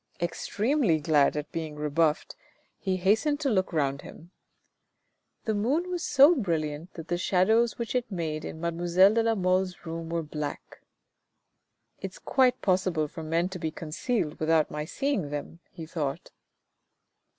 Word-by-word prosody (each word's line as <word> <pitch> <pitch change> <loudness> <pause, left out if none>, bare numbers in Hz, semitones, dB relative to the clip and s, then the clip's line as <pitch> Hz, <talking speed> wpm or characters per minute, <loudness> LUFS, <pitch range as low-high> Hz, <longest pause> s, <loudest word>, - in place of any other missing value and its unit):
Extremely 200 - 0
glad 150 -1 +3
at 150 0 -4
being 160 -2 -4
rebuffed, 150 +1 0 0.4
he 190 -2 -1
hastened 220 +11 +2
to 275 -3 +1
look 190 -3 +1
round 140 -4 0
him. 170 +3 -13 1.1
The 220 - +1
moon 280 - 0
was 355 -1 -2
so 290 +2 +6
brilliant 165 - -2
that 165 -1 -8
the 175 0 -1
shadows 220 +6 +2
which 235 -2 -3
it 250 -2 -1
made 160 -4 -3
in 160 - -7
mademoiselle 175 +4 +3
de 230 - +3
la 225 0 +2
Mole's 185 -1 0
room 165 0 -5
were 165 0 -1
black. 150 -1 -6 0.6
" - - -49
It's - - -6
quite 260 - +2
possible 185 -5 +1
for 160 - -9
men 165 +3 0
to 190 -1 -7
be 160 - -2
concealed 160 - -3
without 160 -1 +2
my 150 0 -3
seeing 230 - -1
them," 145 +3 -6 0.2
be 165 - -7
thought. 155 -4 -4
175 Hz, 155 wpm, -28 LUFS, 155-220 Hz, 1.1 s, so